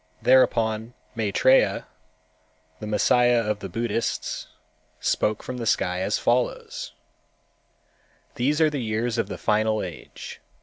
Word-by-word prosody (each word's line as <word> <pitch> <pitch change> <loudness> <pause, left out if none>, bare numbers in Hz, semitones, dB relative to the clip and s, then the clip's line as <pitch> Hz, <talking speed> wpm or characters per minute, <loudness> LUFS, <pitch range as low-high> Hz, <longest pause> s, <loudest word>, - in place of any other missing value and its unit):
Thereupon 115 -3 +3 0.2
Maitrêya, 115 +4 +3 0.9
the 105 - -6
Messiah 120 +3 +3
of 105 -1 -1
the 95 - -6
Buddhists, 115 +3 -2 0.5
spoke 105 0 0
from 125 0 -5
the 115 -2 -4
sky 90 -3 +1
as 100 +2 0
follows: 485 - -1 1.4
"These 145 +3 0
are 155 -1 +4
the 145 -3 -2
years 115 +1 -1
of - - 0
the - - -6
final 110 0 +1
age. 90 -3 -9
115 Hz, 120 wpm, -25 LUFS, 105-125 Hz, 1.4 s, are